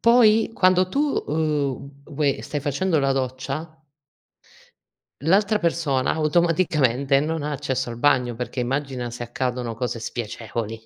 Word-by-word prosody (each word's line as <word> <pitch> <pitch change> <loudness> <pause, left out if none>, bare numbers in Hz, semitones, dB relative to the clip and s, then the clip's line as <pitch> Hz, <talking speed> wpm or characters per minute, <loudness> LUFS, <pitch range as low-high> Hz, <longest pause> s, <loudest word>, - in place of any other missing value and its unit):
Poi, 225 -2 +5
quando 185 0 +4
tu, 275 - -1 0.3
uhm, 140 -3 -2
vuoi 145 -2 -1
stai 145 - -4
facendo 155 +4 0
la 135 0 +2
doccia 135 +5 -4 1.4
l'altra 205 +6 +3
persona 165 -7 0
automaticamente 150 -5 +2
non 155 +1 -1
ha 150 - -3
accesso 130 -3 -2
al 115 - -7
bagno, 125 -4 +2
perché 125 +1 -4
immagina 130 -1 -2
se 120 0 -6
accadono 125 -1 -3
cose 120 0 -3
spiacevoli. 115 -1 -5
140 Hz, 125 wpm, -23 LUFS, 125-160 Hz, 1.4 s, Poi